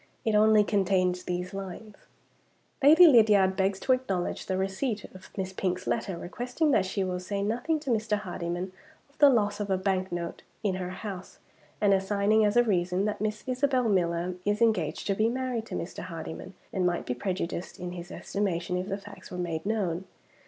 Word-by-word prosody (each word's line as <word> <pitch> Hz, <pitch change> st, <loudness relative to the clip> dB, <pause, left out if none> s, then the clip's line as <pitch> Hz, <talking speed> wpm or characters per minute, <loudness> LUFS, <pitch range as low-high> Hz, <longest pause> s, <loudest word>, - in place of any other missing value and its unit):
It 220 Hz, -, +2 dB
only 215 Hz, 0 st, +6 dB
contained 185 Hz, -3 st, +1 dB
these 180 Hz, +1 st, -3 dB
lines: 195 Hz, +2 st, -7 dB, 0.9 s
"Lady 315 Hz, +6 st, +8 dB
Lydiard 210 Hz, -, +6 dB
begs 195 Hz, 0 st, +1 dB
to -, -, +1 dB
acknowledge 195 Hz, -9 st, -2 dB
the 185 Hz, -, 0 dB
receipt 195 Hz, +4 st, -2 dB
of 185 Hz, 0 st, -13 dB
Miss 190 Hz, -1 st, -3 dB
Pink's 185 Hz, -1 st, -2 dB
letter 200 Hz, -6 st, -1 dB
requesting 250 Hz, -, -1 dB
that 190 Hz, -7 st, +3 dB
she 195 Hz, +1 st, -1 dB
will 180 Hz, -1 st, -2 dB
say 200 Hz, +2 st, -3 dB
nothing 245 Hz, +10 st, 0 dB
to 275 Hz, -4 st, -2 dB
Mr. 220 Hz, -2 st, +1 dB
Hardyman 180 Hz, -2 st, -4 dB, 0.4 s
of 280 Hz, -, -32 dB
the 290 Hz, -, +8 dB
loss 205 Hz, -5 st, +2 dB
of 205 Hz, -1 st, -3 dB
a 190 Hz, -, +2 dB
bank 190 Hz, 0 st, -1 dB
note 170 Hz, -1 st, -4 dB, 0.2 s
in 200 Hz, -3 st, +1 dB
her 180 Hz, -1 st, -4 dB
house, 185 Hz, 0 st, -7 dB, 0.4 s
and, 205 Hz, -2 st, +4 dB
assigning 200 Hz, +2 st, +2 dB
as 210 Hz, +2 st, +2 dB
a 240 Hz, -, +7 dB
reason 185 Hz, -3 st, +1 dB
that 210 Hz, -1 st, -2 dB
Miss 215 Hz, 0 st, -2 dB
Isabel 255 Hz, -1 st, +1 dB
Miller 175 Hz, -2 st, +1 dB
is 205 Hz, +1 st, 0 dB
engaged 230 Hz, -2 st, +1 dB
to 200 Hz, -, +1 dB
be 215 Hz, +3 st, +2 dB
married 250 Hz, -2 st, -2 dB
to -, -, -5 dB
Mr. 170 Hz, -, -5 dB
Hardyman, 170 Hz, +2 st, -7 dB, 0.2 s
and 190 Hz, -, 0 dB
might 175 Hz, -1 st, 0 dB
be 125 Hz, -, -1 dB
prejudiced 180 Hz, +5 st, -4 dB
in 180 Hz, 0 st, -5 dB
his 175 Hz, 0 st, -8 dB
estimation 180 Hz, -3 st, -2 dB
if 185 Hz, +2 st, -3 dB
the 195 Hz, -, -1 dB
facts 205 Hz, 0 st, -12 dB
were 180 Hz, -, -6 dB
made 170 Hz, 0 st, -3 dB
known. 190 Hz, -5 st, -1 dB
195 Hz, 190 wpm, -28 LUFS, 180-220 Hz, 0.9 s, Lady